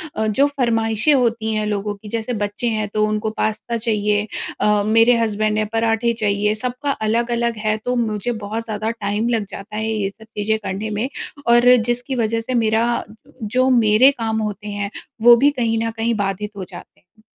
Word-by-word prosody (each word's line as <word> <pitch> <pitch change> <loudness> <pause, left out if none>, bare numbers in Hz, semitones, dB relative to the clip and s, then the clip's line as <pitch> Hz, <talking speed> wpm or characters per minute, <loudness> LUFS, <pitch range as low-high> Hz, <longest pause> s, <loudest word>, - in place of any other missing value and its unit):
अ, 220 0 0
जो 240 +7 +3
फ़रमाइशें 230 -1 +1
होती 230 -4 +1
हैं 215 0 -1
लोगों 205 0 -2
की, 210 +1 -12
जैसे 230 +2 -3
बच्चे 205 +2 -2
हैं, 215 -1 -1
तो 215 0 +2
उनको 215 +1 -1
पास्ता 220 +2 -1
चाहिए 210 -2 0 0.3
अ, 210 -1 +3
मेरे 225 +2 +5
हसबैंड 215 -1 0
हैं, 215 0 0
पराठे 225 +1 +1
चाहिए। 210 0 +1
सबका 250 +5 -3 0.2
अलग-अलग 235 +1 0
है, 215 0 +2
तो 250 0 0
मुझे 225 -1 -1
बहुत 220 +3 -3
ज़्यादा 220 0 -2
टाइम 215 0 -2
लग 225 -3 0
जाता 205 +2 -9
है 220 +1 -2
ये 210 -3 -1
सब 220 +2 -16
चीज़ें 215 +1 +1
करने 200 +3 -3
में 240 - 0 0.4
और 240 +1 +6
जिसकी 245 +2 -1
वज़ह 230 -1 0
से 225 +3 -4
मेरा 225 +2 +1 0.4
जो 255 +5 +1
मेरे 235 +1 +5
काम 225 -4 -2
होते 210 -1 -4
हैं, 205 0 -4 0.3
वो 240 +1 +9
भी 280 +5 +4
कहीं 230 -5 0
न 225 - -2
कहीं 230 +1 0
बाधित 205 0 -2
हो 195 - -4
जाते 175 - -12
हैं। 200 +4 -30
220 Hz, 190 wpm, -20 LUFS, 210-235 Hz, 0.4 s, वो